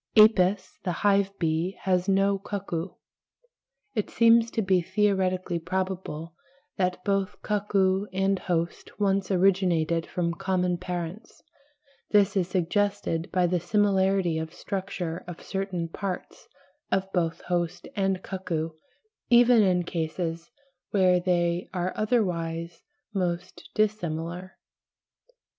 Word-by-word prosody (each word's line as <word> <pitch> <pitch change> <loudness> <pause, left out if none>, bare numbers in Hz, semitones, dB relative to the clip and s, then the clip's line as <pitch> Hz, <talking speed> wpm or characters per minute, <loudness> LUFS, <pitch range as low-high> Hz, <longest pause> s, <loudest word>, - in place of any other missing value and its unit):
Apis 200 -3 +5
(the 180 - -1
hive 200 -1 +4
bee) 165 +3 -1
has 185 0 +1
no 195 0 +3
cuckoo. 190 -3 -4 1.0
It 215 -5 -1
seems 230 0 +5
to 225 - -1
be 190 -1 +3
theoretically 185 -2 0
probable 180 -2 -3 0.4
that 180 -1 -1
both 195 0 0
cuckoo 200 -1 +1
and 195 +1 +1
host 170 +2 -3
once 195 -2 +1
originated 180 -4 +2
from 170 -1 -1
common 180 -1 0
parents; 180 +3 -6 0.7
this 205 0 +4
is 185 -3 +1
suggested 180 -2 0
by 180 -1 +2
the 175 0 +1
similarity 190 -2 +2
of 160 0 -6
structure 185 -4 -4
of 175 -2 -7
certain 190 -3 -3
parts 185 +2 -6 0.4
of 190 0 0
both 165 -3 0
host 175 0 -2
and 195 -2 0
cuckoo, 165 -4 -3 0.6
even 240 -1 +6
in 180 -3 +3
cases 165 +1 -3 0.4
where 185 -3 +4
they 175 0 0
are 180 +1 -1
otherwise 170 -7 -1 0.3
most 180 -2 -3
dissimilar. 180 -4 -2
185 Hz, 115 wpm, -27 LUFS, 175-195 Hz, 1.0 s, even